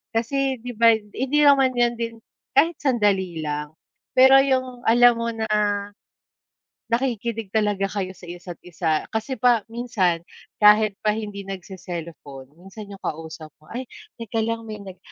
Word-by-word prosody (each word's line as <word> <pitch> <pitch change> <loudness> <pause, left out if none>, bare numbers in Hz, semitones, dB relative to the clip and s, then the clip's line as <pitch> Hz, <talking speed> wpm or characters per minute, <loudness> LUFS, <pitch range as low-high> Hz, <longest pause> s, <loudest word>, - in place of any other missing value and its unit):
Kasi 270 +4 0
'di 245 - -6
ba, 230 0 +6
hindi 250 +7 -2
naman 270 -3 +5
yan 240 0 +3
din 230 0 -3 0.4
kahit 325 +4 +4
sandali 200 - +1
lang, 150 0 -4 0.4
pero 265 +1 +8
yung 255 -2 -1
alam 240 +1 +6
mo 230 0 -1
na, 220 -1 -3 1.4
nakikinig 235 -3 -1
talaga 205 -2 +1
kayo 190 -2 -4
sa - - -13
isa't 175 0 -8
isa 165 -3 -1
kasi, 220 +4 -3
pa 245 -3 +4
minsan 220 -8 0 0.4
kahit 210 -1 +5
pa 210 - +3
hindi 205 -2 -6
nagse-cellphone 170 -7 -8
minsan 195 +3 -11
yung 195 - -11
kausap 160 -1 -6
mo, - - -21
ay, 255 +2 -4 0.4
teka 225 0 -2
lang, 230 0 -3
may 215 -2 -7
nag 190 -2 -10
215 Hz, 145 wpm, -23 LUFS, 185-240 Hz, 1.4 s, pero